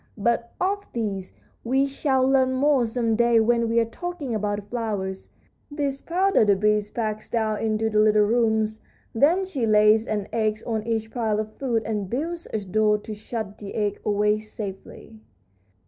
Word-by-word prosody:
But 235 +2 0
of 400 +2 -1
this 200 -5 -3 0.3
we 265 +3 +2
shall 270 -1 +1
learn 260 -1 +3
more 265 -2 +3
some 225 -1 0
day 235 0 +4
when 235 +1 +2
we 230 +1 +3
are 230 - +2
talking 310 +1 -5
about 210 -1 -1
the 205 - -5
flowers. 205 -4 -4 0.4
This 285 -2 -3
powder 375 - +2
the 205 -2 +4
bee 210 +2 +2
packs 215 -2 -3
down 220 -2 0
into 220 0 0
the 215 -1 +1
little 215 0 +5
rooms. 220 -1 +1 0.3
Then 325 +11 +3
she 275 -11 -2
lays 215 +1 +5
an 205 -2 -2
egg 215 -2 +1
on 220 -1 -2
each 220 -1 -2
pile 220 -3 0
of 215 0 -4
food 235 -5 -1
and 210 -3 -3
builds 330 - -3
a 215 - -2
door 210 +2 +2
to 210 +1 -8
shut 210 -1 -6
the 200 -2 -8
egg 205 -2 -1
away 210 0 +2
safely." 215 0 -9
220 Hz, 175 wpm, -24 LUFS, 210-250 Hz, 0.4 s, little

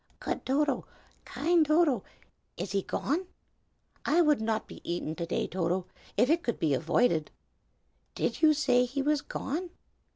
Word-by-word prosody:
"Good - - -4
Toto, 275 -1 +1 0.4
kind 320 +6 +2
Toto, 305 - +3 0.5
is 180 +2 -4
he 200 0 +1
gone? 330 - -2 0.8
I 310 +5 +3
would 300 -7 +4
not 220 -1 -1
be - - -11
eaten 170 -2 -3
to 170 0 -4
day, - - 0
Toto, 180 +1 -1 0.3
if 240 +4 +5
it 330 +4 +3
could 235 -8 -2
be 155 -3 +1
avoided. 165 - +2 0.9
Did - - -1
you 310 -1 +6
say 250 -4 +3
he 275 +3 -2
was 295 0 +2
gone?" 340 +7 -4
255 Hz, 155 wpm, -29 LUFS, 190-300 Hz, 0.9 s, you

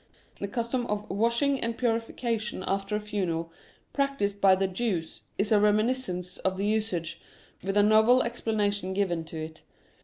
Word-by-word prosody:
The 200 - -2
custom 235 +3 -2
of 210 0 -2
washing 235 +7 +2
and 230 0 -1
purification 230 -3 -1
after 195 +2 -1
a - - 0
funeral 180 -6 -2 0.4
practised 275 -8 0
by 190 -1 +7
the 195 +1 +1
Jews 185 -4 -2 0.2
is 205 +2 0
a 215 - +6
remin 210 +2 +4
iscence 180 -8 -4
of 190 0 -1
the 200 - -1
usage, 210 -6 -1 0.4
with 195 +2 -1
a 205 - +6
novel 220 +4 +5
explanation 205 -5 -1
given 180 -5 0
to 160 0 -8
it. 160 0 -7
205 Hz, 160 wpm, -28 LUFS, 190-230 Hz, 0.4 s, by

